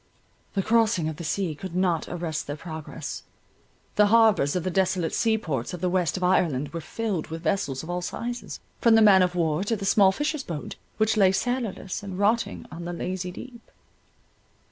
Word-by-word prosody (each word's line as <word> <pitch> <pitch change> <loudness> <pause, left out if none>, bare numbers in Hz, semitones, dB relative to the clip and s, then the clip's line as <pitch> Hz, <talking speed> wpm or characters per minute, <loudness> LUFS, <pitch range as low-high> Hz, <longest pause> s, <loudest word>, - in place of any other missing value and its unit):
The 195 - +1
crossing 220 -6 +2
of 155 - -6
the 170 - -6
sea 170 +1 -1
could 180 +3 -8
not 180 -3 +1
arrest 165 -3 -3
their 145 - -3
progress. 160 0 -7 0.8
The 210 0 +6
harbours 215 -9 +4
of 180 - 0
the 185 - -1
desolate 185 -2 +1
sea 225 -1 +2
ports 150 - -3
of - - -9
the 180 - 0
west 180 -2 +1
of 185 - -4
Ireland 160 -7 +2
were 165 +3 -5
filled 195 +1 -3
with 165 +1 -7
vessels 155 -6 -1
of 160 - -9
all 180 0 -2
sizes, 240 +6 -5 0.2
from 230 -1 +5
the 225 - +6
man 195 -3 +7
of 180 0 +1
war 165 0 +1
to 225 +3 0
the 200 -2 -5
small 195 -1 +5
fishers' 295 +5 -2
boat, 160 -8 -6 0.2
which 220 0 +2
lay 195 -3 +6
sailorless, 225 -3 -2
and 195 -3 -6
rotting 215 +4 +1
on 170 +1 -7
the 175 - -4
lazy 180 +1 -3
deep. 235 +5 -11
185 Hz, 195 wpm, -26 LUFS, 165-215 Hz, 0.8 s, man